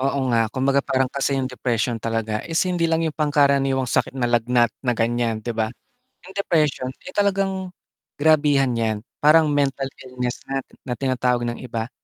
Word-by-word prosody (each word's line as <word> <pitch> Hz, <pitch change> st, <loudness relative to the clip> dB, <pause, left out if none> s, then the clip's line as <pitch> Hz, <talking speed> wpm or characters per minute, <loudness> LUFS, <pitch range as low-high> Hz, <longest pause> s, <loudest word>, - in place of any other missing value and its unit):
Oo 135 Hz, 0 st, 0 dB
nga, 115 Hz, -1 st, +3 dB
kumbaga 135 Hz, +3 st, +1 dB
parang 135 Hz, -1 st, +1 dB
kasi 140 Hz, 0 st, 0 dB
yung 135 Hz, -, 0 dB
depression 120 Hz, -2 st, -1 dB
talaga 115 Hz, -1 st, -2 dB
is 165 Hz, -, -3 dB
hindi 175 Hz, -2 st, 0 dB
lang 165 Hz, 0 st, +1 dB
yung 160 Hz, -, -1 dB
pangkaraniwang 140 Hz, -3 st, +2 dB
sakit 125 Hz, -, -1 dB
na 125 Hz, -, 0 dB
lagnat, 120 Hz, 0 st, +2 dB
na 125 Hz, -3 st, 0 dB
ganiyan, 115 Hz, -1 st, 0 dB
di 120 Hz, -, -2 dB
ba? 110 Hz, -1 st, -1 dB, 0.5 s
Yung 190 Hz, +1 st, -13 dB
depression, 155 Hz, -9 st, +1 dB, 0.2 s
eh, -, -, -8 dB
talagang 195 Hz, -2 st, 0 dB, 0.4 s
grabihan 145 Hz, -3 st, +3 dB
'yan, 110 Hz, -3 st, -1 dB, 0.2 s
parang 155 Hz, +1 st, +5 dB
mental 140 Hz, -2 st, 0 dB
illness 125 Hz, -1 st, -4 dB
na, 135 Hz, 0 st, -2 dB, 0.2 s
na 125 Hz, -, -2 dB
tinatawag 125 Hz, -2 st, 0 dB
ng 120 Hz, -, -6 dB
iba, 115 Hz, -1 st, -5 dB
135 Hz, 170 wpm, -22 LUFS, 120-150 Hz, 0.5 s, parang